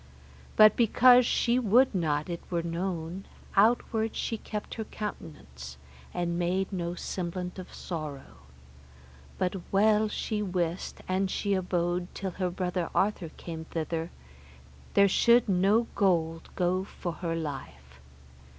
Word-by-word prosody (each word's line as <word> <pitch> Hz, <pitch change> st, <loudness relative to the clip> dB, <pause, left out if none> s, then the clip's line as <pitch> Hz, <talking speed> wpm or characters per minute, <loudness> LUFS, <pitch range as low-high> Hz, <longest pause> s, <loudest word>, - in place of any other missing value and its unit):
But 215 Hz, -1 st, +8 dB
because 245 Hz, +1 st, +6 dB
she 240 Hz, +1 st, +2 dB
would 250 Hz, +3 st, +4 dB
not 155 Hz, -5 st, 0 dB
it 170 Hz, -1 st, -4 dB
were 170 Hz, -2 st, -1 dB
known, 170 Hz, +1 st, -3 dB, 0.3 s
outward 220 Hz, +1 st, +2 dB
she 230 Hz, -, -2 dB
kept 210 Hz, -1 st, -6 dB
her 225 Hz, -, -4 dB
countenance, 65 Hz, -, -8 dB, 0.3 s
and 170 Hz, 0 st, -2 dB
made 185 Hz, +3 st, 0 dB
no 175 Hz, -1 st, -2 dB
semblant 180 Hz, +1 st, -4 dB
of 185 Hz, -, -9 dB
sorrow. 145 Hz, -, -7 dB, 1.0 s
But 185 Hz, +1 st, -1 dB
well 215 Hz, +2 st, +4 dB
she 210 Hz, 0 st, -2 dB
wist 180 Hz, -3 st, -2 dB
an 190 Hz, +1 st, +1 dB
she 200 Hz, +2 st, -1 dB
abode 175 Hz, -1 st, 0 dB
till 195 Hz, -1 st, -3 dB
her 185 Hz, +1 st, -2 dB
brother 180 Hz, -1 st, -2 dB
Arthur 195 Hz, -4 st, +1 dB
came 160 Hz, -1 st, -7 dB
thither, 165 Hz, +1 st, -3 dB, 0.9 s
there 200 Hz, 0 st, +7 dB
should 235 Hz, +4 st, +4 dB
no 200 Hz, +4 st, +3 dB
gold 165 Hz, -5 st, +1 dB
go 185 Hz, +1 st, +1 dB
for 180 Hz, -2 st, -5 dB
her 165 Hz, -2 st, -1 dB
life. 100 Hz, -, -7 dB
180 Hz, 130 wpm, -28 LUFS, 165-205 Hz, 1.0 s, But